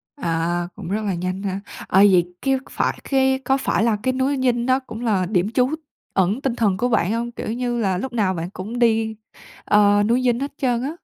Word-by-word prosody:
À, 170 Hz, -, -1 dB
cũng 195 Hz, -5 st, -8 dB
rất 210 Hz, +3 st, -1 dB
là 200 Hz, -, 0 dB
nhanh 185 Hz, +2 st, -3 dB
ha. 195 Hz, -1 st, -2 dB, 0.3 s
Ờ, 190 Hz, -, +3 dB
vậy 180 Hz, -1 st, +2 dB
cái 270 Hz, -1 st, +2 dB
phải -, -, -1 dB
cái 265 Hz, -1 st, +3 dB
có 270 Hz, +2 st, +3 dB
phải 265 Hz, -, 0 dB
là 225 Hz, -2 st, +2 dB
cái 260 Hz, -, +1 dB
núi 265 Hz, +2 st, 0 dB
Dinh 240 Hz, -2 st, +1 dB
nó 260 Hz, +1 st, +3 dB
cũng 240 Hz, -4 st, -9 dB
là 205 Hz, -6 st, +1 dB
điểm 190 Hz, +1 st, 0 dB
trú 250 Hz, +1 st, +2 dB, 0.4 s
ẩn 195 Hz, +7 st, +1 dB
tinh 265 Hz, -4 st, -1 dB
thần 205 Hz, -6 st, +1 dB
của 245 Hz, +5 st, 0 dB
bạn 210 Hz, -5 st, +1 dB
hông? 235 Hz, +1 st, -2 dB
Kiểu 230 Hz, -, -5 dB
như 240 Hz, -1 st, -2 dB
là, 190 Hz, -4 st, +1 dB
lúc 250 Hz, +6 st, -5 dB
nào 205 Hz, -5 st, +1 dB
bạn 170 Hz, 0 st, -4 dB
cũng 210 Hz, +6 st, -6 dB
đi, 225 Hz, -2 st, +2 dB, 0.5 s
à, 205 Hz, 0 st, +4 dB
núi 235 Hz, +4 st, +2 dB
Dinh 245 Hz, -1 st, +2 dB
hết 280 Hz, +1 st, -4 dB
trơn 245 Hz, -4 st, 0 dB
á. 275 Hz, -, -2 dB
225 Hz, 230 wpm, -22 LUFS, 190-250 Hz, 0.5 s, à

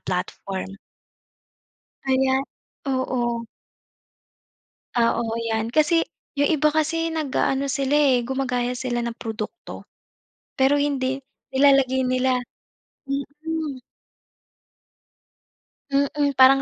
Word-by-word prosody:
platform. 190 Hz, +1 st, -4 dB, 1.3 s
Kaya 265 Hz, 0 st, +2 dB, 0.6 s
oo. 245 Hz, -3 st, 0 dB, 1.6 s
Oo 235 Hz, 0 st, +3 dB, 0.2 s
'yan, 225 Hz, 0 st, -1 dB
kasi 325 Hz, +2 st, +4 dB, 0.4 s
'yong 285 Hz, -, +3 dB
iba 305 Hz, +1 st, +4 dB
kasi 325 Hz, +1 st, 0 dB
nag-aano 280 Hz, -2 st, 0 dB
sila, 275 Hz, +1 st, 0 dB
eh, 270 Hz, -5 st, +4 dB
gumagaya 250 Hz, -1 st, -1 dB
sila 240 Hz, -1 st, -2 dB
ng 235 Hz, -, -3 dB
produkto. 220 Hz, +7 st, -6 dB, 0.7 s
Pero 280 Hz, +2 st, +4 dB
hindi 270 Hz, -2 st, 0 dB, 0.3 s
nilalagay 265 Hz, -1 st, +4 dB
nila 255 Hz, 0 st, +2 dB, 0.7 s
mm. 285 Hz, +1 st, -4 dB, 2.1 s
Mm, 280 Hz, 0 st, +1 dB
parang 270 Hz, +1 st, +8 dB
265 Hz, 85 wpm, -24 LUFS, 250-285 Hz, 2.1 s, parang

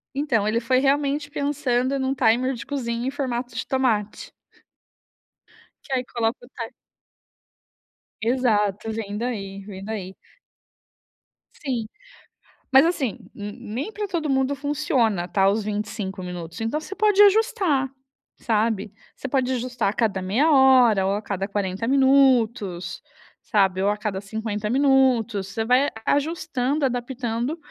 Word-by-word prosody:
Então, 240 Hz, -8 st, +1 dB
ele 230 Hz, +2 st, +1 dB
foi 255 Hz, +2 st, +1 dB
realmente 285 Hz, +1 st, +1 dB
pensando 275 Hz, -2 st, 0 dB
num 265 Hz, 0 st, 0 dB
timer 255 Hz, +1 st, +2 dB
de 235 Hz, -, -7 dB
cozinha 240 Hz, -3 st, -3 dB
em 265 Hz, -, -1 dB
formato 245 Hz, -3 st, -3 dB
de 225 Hz, -, -3 dB
tomate. 230 Hz, -6 st, -1 dB, 1.5 s
Que 275 Hz, -, -6 dB
aí 255 Hz, -1 st, 0 dB
coloca 235 Hz, +1 st, -2 dB
o -, -, -20 dB
timer 230 Hz, -3 st, -7 dB, 1.5 s
Exato, 220 Hz, -3 st, +1 dB
vem 210 Hz, -2 st, -4 dB
daí, 205 Hz, -5 st, -4 dB
vem 195 Hz, -2 st, -9 dB
daí. 195 Hz, -3 st, -5 dB, 1.4 s
Sim. 245 Hz, -6 st, -3 dB, 0.8 s
Mas, 265 Hz, +3 st, +7 dB
assim, 295 Hz, -, -1 dB, 0.2 s
nem 210 Hz, -, -6 dB
pra 420 Hz, -1 st, -4 dB
todo 330 Hz, -5 st, -2 dB
mundo 265 Hz, +1 st, +1 dB
funciona, 265 Hz, -10 st, 0 dB
tá, 195 Hz, +1 st, +3 dB
os 210 Hz, +2 st, 0 dB
25 205 Hz, -2 st, -4 dB
minutos. 175 Hz, -2 st, -7 dB
Então, 225 Hz, +7 st, -1 dB
você 340 Hz, -, -8 dB
pode 415 Hz, 0 st, +4 dB
ajustar, 395 Hz, -, +3 dB, 0.5 s
sabe. 215 Hz, -3 st, 0 dB, 0.2 s
Você -, -, -6 dB
pode 260 Hz, -1 st, 0 dB
ajustar 245 Hz, -3 st, -1 dB
a -, -, -3 dB
cada 210 Hz, -4 st, 0 dB
meia 235 Hz, +13 st, +2 dB
hora 255 Hz, -7 st, +5 dB
ou 195 Hz, -, +1 dB
a 205 Hz, -, -2 dB
cada 195 Hz, -2 st, -3 dB
40 200 Hz, +1 st, -2 dB
minutos, 245 Hz, -9 st, +2 dB, 0.4 s
sabe. 190 Hz, -4 st, +1 dB
Ou 200 Hz, -, +2 dB
a 210 Hz, -, 0 dB
cada 210 Hz, -3 st, -3 dB
50 210 Hz, 0 st, -4 dB
minutos. 255 Hz, -6 st, +2 dB
Você 220 Hz, +3 st, -3 dB
vai 255 Hz, +4 st, +3 dB, 0.2 s
aju 290 Hz, +3 st, +2 dB
ajustando, 290 Hz, -3 st, -1 dB
adaptando 245 Hz, +2 st, -2 dB
240 Hz, 135 wpm, -23 LUFS, 210-270 Hz, 1.5 s, Mas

